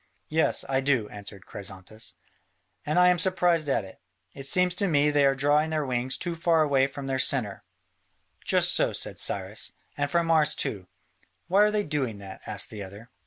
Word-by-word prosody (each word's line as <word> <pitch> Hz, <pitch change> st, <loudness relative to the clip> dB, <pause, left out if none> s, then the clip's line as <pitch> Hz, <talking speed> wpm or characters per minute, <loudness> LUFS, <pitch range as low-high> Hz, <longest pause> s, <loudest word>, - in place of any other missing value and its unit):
"Yes, 160 Hz, +1 st, +1 dB
I 135 Hz, -1 st, +1 dB
do," 135 Hz, -6 st, +1 dB
answered 100 Hz, -1 st, -10 dB
Chrysantas, 95 Hz, +2 st, -7 dB, 0.7 s
"and 150 Hz, -, 0 dB
I 180 Hz, 0 st, +6 dB
am 180 Hz, -1 st, +2 dB
surprised 175 Hz, -5 st, +2 dB
at 115 Hz, -7 st, 0 dB
it: 95 Hz, -, -15 dB, 0.3 s
it 135 Hz, 0 st, -8 dB
seems 180 Hz, +4 st, +3 dB
to 195 Hz, +3 st, 0 dB
me 150 Hz, -3 st, +3 dB
they 145 Hz, -1 st, +4 dB
are 135 Hz, -, +2 dB
drawing 145 Hz, +3 st, +2 dB
their 155 Hz, -2 st, -1 dB
wings 125 Hz, 0 st, -1 dB
too 175 Hz, -1 st, -3 dB
far 165 Hz, -1 st, +2 dB
away 135 Hz, -3 st, +2 dB
from 140 Hz, 0 st, -8 dB
their 135 Hz, -1 st, -1 dB
centre." 120 Hz, -7 st, +1 dB, 0.8 s
"Just -, -, +3 dB
so," -, -, +2 dB
said -, -, -3 dB
Cyrus, -, -, 0 dB, 0.2 s
"and 145 Hz, 0 st, -1 dB
from 170 Hz, +1 st, +1 dB
ours 150 Hz, -2 st, +3 dB
too." 95 Hz, -3 st, -4 dB, 0.6 s
"Why 190 Hz, +3 st, +4 dB
are -, -, +3 dB
they 210 Hz, -1 st, 0 dB
doing 135 Hz, -, -2 dB
that?" 100 Hz, -1 st, -10 dB
asked 105 Hz, -1 st, -1 dB
the 105 Hz, -2 st, -7 dB
other. 100 Hz, +5 st, -11 dB
140 Hz, 190 wpm, -26 LUFS, 115-160 Hz, 0.8 s, I